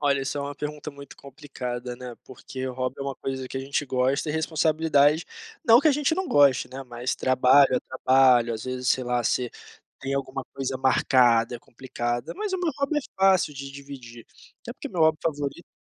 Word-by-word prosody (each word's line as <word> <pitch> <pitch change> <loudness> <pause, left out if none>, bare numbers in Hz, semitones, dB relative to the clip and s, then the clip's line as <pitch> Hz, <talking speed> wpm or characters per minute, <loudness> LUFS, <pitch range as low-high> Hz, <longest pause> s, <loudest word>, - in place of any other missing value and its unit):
Olha, 140 -2 +2
essa 135 +2 -3
é - - -2
uma 145 0 -5
pergunta 150 +1 -6
muito 140 -1 -12
complicada, 125 -3 -7
né, 125 -1 -8
porque 130 +1 -8
o - - -5
hobby 130 +1 -3
é - - -2
uma 140 -1 -4
coisa 130 -1 -5
que - - -7
a - - -2
gente 140 +2 -2
gosta 130 +3 0
e - - -1
responsabilidade, 155 -1 +2 0.4
não 235 +2 +7
que 310 - +4
a - - +4
gente 295 +2 +1
não 375 0 -3
goste, 140 -4 +4
né, 135 +1 -7
mas 120 0 -4
trabalho 130 +1 +4
é 125 - +1
trabalho. 130 -2 +3
às 110 - -7
vezes, 130 -1 -3
sei 130 - +2
lá, 125 0 0
você 125 +1 0 0.5
tem 135 0 -3
alguma 135 -1 -4
coisa 135 -1 -3
marcada, 125 -3 +3
é - - -15
complicada. 120 -1 -5
Mas 420 0 -3
o 375 - -1
meu 350 -2 0
hobby 280 +2 0
é - - -2 0.2
fácil 190 -5 +3
de 140 0 -7
dividir, 135 -4 -11 0.4
até - - -7
porque - - -8
meu 175 - -4
hobby 160 -1 +4
favorito 145 +1 -3
135 Hz, 210 wpm, -25 LUFS, 125-150 Hz, 0.5 s, não